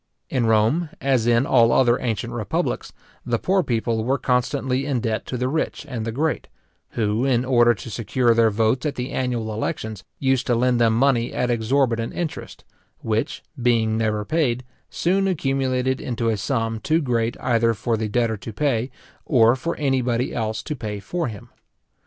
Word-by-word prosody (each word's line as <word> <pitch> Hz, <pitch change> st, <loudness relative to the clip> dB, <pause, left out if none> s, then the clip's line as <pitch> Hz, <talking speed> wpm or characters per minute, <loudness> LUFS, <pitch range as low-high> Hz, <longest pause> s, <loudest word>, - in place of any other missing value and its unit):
In 125 Hz, -4 st, +1 dB
Rome, 115 Hz, +10 st, +2 dB
as 130 Hz, -4 st, +1 dB
in 120 Hz, +2 st, +4 dB
all 120 Hz, -4 st, +4 dB
other 120 Hz, -2 st, +4 dB
ancient 115 Hz, -5 st, -2 dB
republics, -, -, -2 dB, 0.3 s
the 120 Hz, -1 st, 0 dB
poor 190 Hz, +9 st, +2 dB
people 115 Hz, -5 st, -1 dB
were 130 Hz, +4 st, +1 dB
constantly 130 Hz, +1 st, 0 dB
in 140 Hz, -3 st, -1 dB
debt 110 Hz, -1 st, -2 dB
to 125 Hz, -, -3 dB
the 125 Hz, +1 st, -1 dB
rich 155 Hz, +1 st, -2 dB
and 125 Hz, -6 st, -4 dB
the 115 Hz, -, -2 dB
great, 150 Hz, +7 st, -1 dB, 0.5 s
who, 110 Hz, +1 st, 0 dB
in 130 Hz, -2 st, +2 dB
order 120 Hz, -2 st, +4 dB
to 105 Hz, -, -9 dB
secure 115 Hz, +2 st, +1 dB
their 115 Hz, -1 st, +4 dB
votes 110 Hz, +4 st, +1 dB
at 150 Hz, -3 st, -2 dB
the 125 Hz, +2 st, -4 dB
annual 120 Hz, -4 st, -2 dB
elections, 110 Hz, -1 st, -4 dB
used 130 Hz, -2 st, +1 dB
to 120 Hz, -, +3 dB
lend 125 Hz, 0 st, +2 dB
them 115 Hz, -1 st, +3 dB
money 120 Hz, -2 st, +2 dB
at 125 Hz, 0 st, 0 dB
exorbitant 115 Hz, 0 st, 0 dB
interest, 170 Hz, -3 st, -5 dB, 0.4 s
which, 115 Hz, +5 st, -2 dB, 0.2 s
being 115 Hz, -2 st, +2 dB
never 105 Hz, -2 st, 0 dB
paid, 130 Hz, -6 st, 0 dB, 0.3 s
soon 195 Hz, +3 st, +1 dB
accumulated 130 Hz, -6 st, 0 dB
into 115 Hz, -2 st, -1 dB
a 110 Hz, -, +1 dB
sum 115 Hz, +1 st, -1 dB
too 160 Hz, +8 st, +1 dB
great 120 Hz, -5 st, -1 dB
either 115 Hz, -2 st, +2 dB
for 115 Hz, +2 st, -1 dB
the 110 Hz, -1 st, -2 dB
debtor 115 Hz, 0 st, 0 dB
to 100 Hz, +4 st, -8 dB
pay, 125 Hz, 0 st, 0 dB, 0.4 s
or 120 Hz, -4 st, +5 dB
for 165 Hz, +6 st, -3 dB
any 135 Hz, -3 st, +1 dB
body 125 Hz, 0 st, -1 dB
else 110 Hz, -1 st, -2 dB
to 150 Hz, -, -4 dB
pay 105 Hz, -5 st, -5 dB
for 170 Hz, -, -3 dB
him. 105 Hz, -4 st, -9 dB
120 Hz, 180 wpm, -23 LUFS, 115-130 Hz, 0.5 s, or